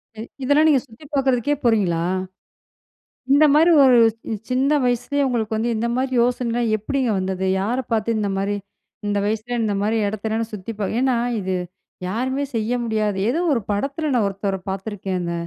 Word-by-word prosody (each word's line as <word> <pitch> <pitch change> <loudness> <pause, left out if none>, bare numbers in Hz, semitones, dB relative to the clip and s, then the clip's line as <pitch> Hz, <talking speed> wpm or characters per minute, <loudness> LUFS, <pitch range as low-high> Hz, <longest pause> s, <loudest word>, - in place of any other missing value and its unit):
சரி. 220 +2 -7 0.2
இதெல்லாம் 290 +4 +4
நீங்க 275 -5 +4
சுத்தி 230 +6 -16
பார்க்குறதுக்கே 270 +1 +1
போறீங்களா? 185 -8 +2 1.3
இந்த 290 +2 +6
மாரி 325 +3 +5
ஒரு 255 -3 +6 0.2
ச் 225 -2 -6
சின்ன 260 +3 +2
வயசுலேயே 245 +4 0
உங்களுக்கு 225 -3 -1
வந்து 235 +2 0
இந்த 230 - -1
மாரி 260 +1 0
யோசனைலாம் 240 -1 0
எப்படிங்க 255 +3 -1
வந்தது? 190 0 -2 0.2
யார 220 +6 -1 0.2
பார்த்து 225 +1 +1
இந்த 205 -1 0
மாரி, 200 +1 -1 0.5
'இந்த 205 0 0
வயசுல 220 +3 -2
இந்த 210 -2 0
மாரி 215 +2 +1
இடத்தயல்லாம் 220 +2 -2
நா 225 - -5
சுத்தி 205 +3 -6
பா' 205 - -1
ஏன்னா 260 -1 +2 0.2
இது 190 0 -2 0.5
யாருமே 260 +7 -1
செய்ய 225 +1 -1
முடியாது. 215 -3 0
ஏதோ 305 +8 +1
ஒரு 250 - +1
படத்துல 280 +9 -1
நா 245 - +3
ஒருத்தவர 195 0 -2
பார்த்துருக்கேங்க. 190 -3 -3
225 Hz, 165 wpm, -21 LUFS, 205-255 Hz, 1.3 s, இந்த